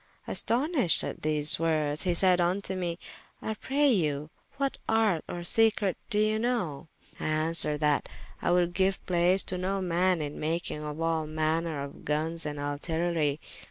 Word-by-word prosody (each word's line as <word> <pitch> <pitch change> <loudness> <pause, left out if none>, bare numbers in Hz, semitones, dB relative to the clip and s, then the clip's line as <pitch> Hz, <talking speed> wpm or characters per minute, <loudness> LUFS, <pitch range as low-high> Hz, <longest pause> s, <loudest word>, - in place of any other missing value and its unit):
Astonyshed 255 - +3
at - - -5
these 150 -1 +4
woordes, 155 -2 0
he 175 -1 +1
sayde 180 0 +3
vnto 185 +2 0
mee, 175 -2 -3 0.4
I 220 - -3
pray 280 +6 0
you 150 - -1 0.3
what 275 -1 -1
arte 220 -7 +2
or 175 - -5
secrete 215 -1 +2
doe 210 - 0
you 215 +1 +2
know? 200 - -2 0.3
I - - -5
answered, 155 -1 +2
that 150 -1 +1 0.3
I - - 0
would 175 0 +2
giue 190 +1 +2
place 180 +2 +3
to 185 - -3
no 195 +2 -1
man 180 0 +1
in 150 -1 -5
makyng 160 0 -2
of 150 0 -6
all 165 -1 -1
manner 155 -1 -1
of 140 - -10
gunnes 155 +2 -1
and 145 -1 -5
artillerie. 155 +1 -1
170 Hz, 160 wpm, -28 LUFS, 155-190 Hz, 0.4 s, these